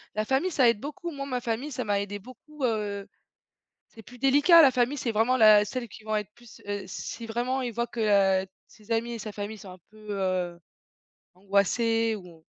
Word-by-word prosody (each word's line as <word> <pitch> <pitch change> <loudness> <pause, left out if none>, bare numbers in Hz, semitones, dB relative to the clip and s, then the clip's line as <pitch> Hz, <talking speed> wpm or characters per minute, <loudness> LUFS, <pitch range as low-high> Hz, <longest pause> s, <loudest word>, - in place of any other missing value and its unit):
La 215 - 0
famille, 270 +10 0
ça 255 -6 +4
aide 230 - 0
beaucoup, 335 +5 -6
moi, 275 -1 -5
ma 250 -3 -3
famille, 235 +6 -3
ça 250 - -3
m'a 205 -1 0
aidée 205 0 -5
beaucoup, 265 +6 -12
heu. 205 -3 -2 0.8
C'est 225 - -15
plus 250 +4 -14
délicat, 290 +6 +6
la 275 -4 +6
famille, 250 +4 +1
c'est 235 -3 -2
vraiment 235 +4 +2
la 215 -2 +7
celles 235 +3 -5
qui 220 - -14
vont 215 0 -2
être 210 -1 -5
plus 240 -1 -16
heu, 205 -1 -3
si 230 +5 -7
vraiment 245 +3 -1
ils 245 -2 -3
voient 235 +2 -2
que, 200 -4 +2
heu, - - -11 0.2
ses 215 +1 -16
amis 235 +1 0
et 230 - -6
sa 215 0 -6
famille 205 +1 -6
sont 190 -2 -11
un 185 - -13
peu, 215 0 -16
heu, 185 -3 -2 0.8
angoissés 220 +4 +1
ou 175 -4 -14
225 Hz, 210 wpm, -27 LUFS, 205-255 Hz, 0.8 s, la